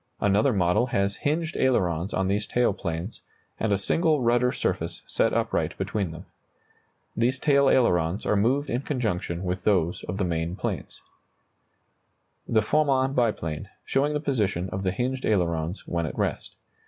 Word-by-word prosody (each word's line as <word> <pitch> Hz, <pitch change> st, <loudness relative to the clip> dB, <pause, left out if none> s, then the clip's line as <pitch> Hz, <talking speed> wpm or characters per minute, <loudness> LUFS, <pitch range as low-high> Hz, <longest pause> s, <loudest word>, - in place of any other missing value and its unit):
Another 105 Hz, +6 st, +3 dB
model 95 Hz, +3 st, +2 dB
has 100 Hz, -3 st, 0 dB
hinged 160 Hz, +3 st, -1 dB
ailerons 95 Hz, -8 st, +1 dB
on 95 Hz, -, 0 dB
these 100 Hz, +2 st, 0 dB
tail 125 Hz, 0 st, +2 dB
planes, 85 Hz, +4 st, -5 dB, 0.4 s
and 110 Hz, -, 0 dB
a 100 Hz, -, +3 dB
single 155 Hz, -, +2 dB
rudder 120 Hz, 0 st, +2 dB
surface -, -, -2 dB
set -, -, +1 dB
upright -, -, -1 dB
between 100 Hz, -5 st, -2 dB
them. 80 Hz, +3 st, -9 dB, 0.9 s
These 120 Hz, +3 st, +1 dB
tail 140 Hz, -1 st, +4 dB
ailerons 90 Hz, -6 st, +2 dB
are -, -, +2 dB
moved 130 Hz, +8 st, +2 dB
in 120 Hz, +1 st, -1 dB
conjunction 100 Hz, -, -2 dB
with 90 Hz, 0 st, -3 dB
those 90 Hz, -5 st, +1 dB
of 95 Hz, -, -4 dB
the 100 Hz, -, 0 dB
main 85 Hz, 0 st, -1 dB
planes. 95 Hz, -, -5 dB, 1.4 s
[Illustration: -, -, -4 dB
The 110 Hz, -, +6 dB
Farman 135 Hz, 0 st, +2 dB
biplane, 105 Hz, -, -1 dB, 0.2 s
showing 145 Hz, +2 st, +1 dB
the 150 Hz, -, 0 dB
position 105 Hz, -, -1 dB
of 95 Hz, -, -3 dB
the 95 Hz, -1 st, 0 dB
hinged 130 Hz, +6 st, -2 dB
ailerons 85 Hz, -3 st, 0 dB
when 85 Hz, -2 st, -1 dB
at -, -, -7 dB
rest. -, -, -2 dB
105 Hz, 160 wpm, -26 LUFS, 90-130 Hz, 1.4 s, The